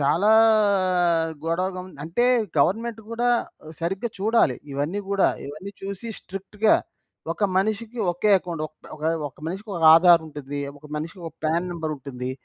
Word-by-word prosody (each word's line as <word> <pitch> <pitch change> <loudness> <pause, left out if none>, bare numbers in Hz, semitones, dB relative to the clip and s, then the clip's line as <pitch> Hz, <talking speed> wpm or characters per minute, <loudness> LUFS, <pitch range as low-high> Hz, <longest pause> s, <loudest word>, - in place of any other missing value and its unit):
చాలా 170 +9 +3 1.1
గొడవగం 185 +2 -2 0.2
అంటే 170 +10 0 0.3
గవర్నమెంట్ 225 +9 +1
గూడా 240 +1 0 0.5
సరిగ్గా 190 +7 -2
చూడాలి 205 - +2 0.2
ఇవన్నీ 145 +9 -2
గూడా. 200 -1 +3 0.2
ఇవన్నీ 155 +8 -8
చూసి 200 +4 -5
స్ట్రిక్ట్‌గా 205 +3 0 0.6
ఒక 205 - -1
మనిషికి 220 +4 -2
ఒకే 195 +5 +1
అకౌంట్. 170 -4 -5 0.3
ఒకే 155 +1 0 0.2
ఒక - - -24
మనిషికొక 190 0 -5
ఆధార్ 170 0 +6
ఉండిద్ధి. 145 -2 -6 0.2
ఒక 150 - -14
మనిషికొక 165 +2 -6
ప్యాన్ 170 +3 +1
నంబర్ 160 -2 -3
ఉంటుంది. 130 -2 -6
180 Hz, 125 wpm, -24 LUFS, 155-205 Hz, 1.1 s, ఆధార్